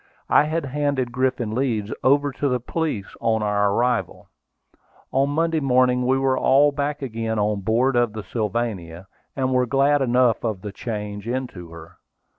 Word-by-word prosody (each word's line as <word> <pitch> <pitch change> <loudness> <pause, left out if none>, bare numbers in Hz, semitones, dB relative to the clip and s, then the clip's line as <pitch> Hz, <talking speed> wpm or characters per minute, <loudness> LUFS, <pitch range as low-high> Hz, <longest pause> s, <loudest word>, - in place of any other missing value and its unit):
I 150 - +6
had 160 0 -2
handed 140 -2 -1
Griffin 125 -3 -1
Leeds 115 -4 -1
over 145 +1 +3
to 140 +1 -1
the 125 -1 0
police 125 -5 -3
on 110 -1 +1
our 105 -1 +1
arrival. 120 +4 -1 0.8
On 135 +1 +2
Monday 165 +2 +1
morning 125 -2 +2
we 130 +1 +3
were 135 -1 +1
all 140 +2 +4
back 145 0 -3
again 115 -3 -3
on 105 -1 0
board 120 +6 +1
of 120 -3 +2
the 110 -1 -6
Sylvania, 100 -5 -3 0.3
and 130 -1 0
were 125 -1 +2
glad 140 +2 +3
enough 125 -2 +2
of 110 -5 -2
the 105 - -5
change 105 -1 -6
into 120 -9 -4
her. 85 0 -13
125 Hz, 165 wpm, -23 LUFS, 105-135 Hz, 0.8 s, I